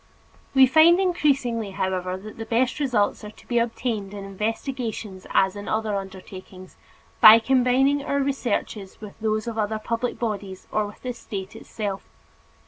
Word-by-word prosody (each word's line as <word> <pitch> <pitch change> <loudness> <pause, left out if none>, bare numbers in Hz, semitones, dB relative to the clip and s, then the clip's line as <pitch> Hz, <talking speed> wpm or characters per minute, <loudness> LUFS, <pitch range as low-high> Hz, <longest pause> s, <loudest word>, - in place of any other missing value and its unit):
We 265 0 +8
find 320 +6 +6
increasingly, 275 - +1
however, 185 -1 -2
that 215 +3 -11
the 225 - -4
best 245 +5 +1
results 245 -10 0
are 210 - -7
to 215 - -18
be 240 -1 +1
obtained 225 -4 -3
in 200 -1 -7
investigations 215 -1 -4
as 190 0 +2
in 205 0 -8
other 215 -1 -1
undertakings, 190 -1 -9 0.4
by 220 +1 +10
combining 265 +3 +2
our 280 - -1
researches 240 -7 -2
with 210 -2 -9
those 215 0 -1
of 230 -1 -4
other 215 +1 -1
public 230 +3 -3
bodies 200 -5 -4
or 215 -1 0
with 205 - -14
the 250 -1 -3
State 195 -5 -7
itself. 200 -3 -6
220 Hz, 155 wpm, -24 LUFS, 200-250 Hz, 0.4 s, by